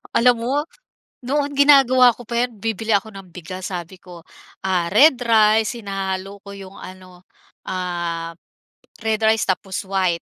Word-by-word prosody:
Alam 240 Hz, -1 st, +3 dB
mo 250 Hz, +3 st, -1 dB, 0.7 s
noon 285 Hz, +3 st, -1 dB
ginagawa 270 Hz, -3 st, +6 dB
ko 245 Hz, -2 st, -13 dB
pa 235 Hz, +1 st, 0 dB
'yan 230 Hz, -5 st, -15 dB
bibili 225 Hz, +1 st, -3 dB
ako 210 Hz, +2 st, -2 dB
ng 190 Hz, -2 st, -12 dB
bigas 180 Hz, +2 st, -8 dB
sabi 175 Hz, 0 st, -6 dB
ko, 175 Hz, -2 st, -13 dB, 0.4 s
ah, 180 Hz, -3 st, 0 dB
red 270 Hz, +8 st, +6 dB
rice 220 Hz, 0 st, +3 dB
hinahalo 195 Hz, -1 st, -5 dB
ko 200 Hz, -, -10 dB
'yong 195 Hz, 0 st, -11 dB
ano, 185 Hz, -1 st, -13 dB, 0.4 s
ap 175 Hz, -2 st, -4 dB, 0.7 s
red 220 Hz, -1 st, -1 dB
rice 220 Hz, +1 st, +2 dB
tapos 190 Hz, 0 st, -2 dB
white. 185 Hz, -3 st, 0 dB
195 Hz, 145 wpm, -20 LUFS, 185-230 Hz, 0.7 s, ginagawa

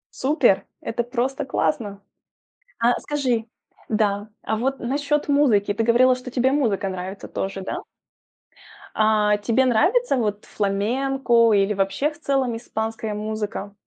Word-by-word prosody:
Супер! 255 Hz, -, +2 dB
Это 240 Hz, +1 st, -2 dB
просто 265 Hz, +3 st, -2 dB
классно! 200 Hz, -1 st, -2 dB, 0.8 s
А 235 Hz, +1 st, +2 dB
скажи 255 Hz, -6 st, -1 dB, 0.4 s
Да, 210 Hz, -1 st, 0 dB
а 220 Hz, -, -1 dB
вот 265 Hz, +4 st, -1 dB
насчёт 285 Hz, +4 st, -1 dB
музыки. 245 Hz, -9 st, +3 dB
Ты 225 Hz, +1 st, 0 dB
говорила, 250 Hz, +2 st, +4 dB
тебе 250 Hz, +1 st, 0 dB
музыка 225 Hz, -9 st, +1 dB
нравится 190 Hz, +1 st, -6 dB
тоже, 195 Hz, 0 st, -4 dB
да? -, -, -4 dB, 1.2 s
А, 215 Hz, -1 st, +3 dB
тебе 230 Hz, +5 st, +2 dB
нравится 315 Hz, -, +2 dB
вот 210 Hz, -3 st, -2 dB
фламенко 230 Hz, +4 st, +1 dB
или 200 Hz, 0 st, +3 dB
вообще 195 Hz, +10 st, 0 dB
в 300 Hz, +1 st, -16 dB
целом 265 Hz, -5 st, 0 dB
испанская 225 Hz, -1 st, -4 dB
музыка? 210 Hz, -1 st, -4 dB
230 Hz, 125 wpm, -23 LUFS, 205-265 Hz, 1.2 s, говорила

